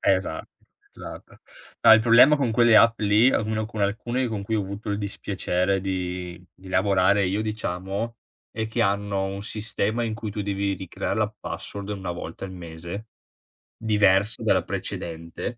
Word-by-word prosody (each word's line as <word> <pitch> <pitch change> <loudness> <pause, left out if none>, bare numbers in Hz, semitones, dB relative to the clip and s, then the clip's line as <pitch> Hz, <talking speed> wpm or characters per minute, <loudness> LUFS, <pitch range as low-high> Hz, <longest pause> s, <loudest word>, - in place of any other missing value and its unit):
esatto, 90 -4 -4 0.5
esatto. - - -11 0.4
No, 110 - +10
il 110 - +7
problema 125 +6 +7
con 125 -5 0
quelle 120 -1 +6
app 115 +1 +5
lì, 105 +5 +5
o - - +2
almeno 110 0 -2
con 110 -2 -5
alcune 120 +5 -1
con 105 -3 -4
cui 110 +2 -1
ho 105 - +1
avuto 100 +2 -6
il 100 - 0
dispiacere 95 -2 -1
di 90 -2 -4
di 95 0 -13
lavorare 100 +1 +3
io 100 +3 0
diciamo, 105 +1 -3 0.3
è 110 0 -3
che 110 - -1
hanno 100 0 0
un 100 +1 -5
sistema 110 +2 -2
in 110 -1 -2
cui 110 -2 -5
tu 105 - -3
devi 100 0 -1
ricreare 95 +2 -4
la 105 0 0
password 100 0 -6
1 95 -3 -4
volta 85 +2 -7
al 95 - -8
mese, 85 +4 -8 0.7
diversa 105 -1 +3
dalla - - +3
precedente 85 0 -5
100 Hz, 165 wpm, -25 LUFS, 95-110 Hz, 0.7 s, No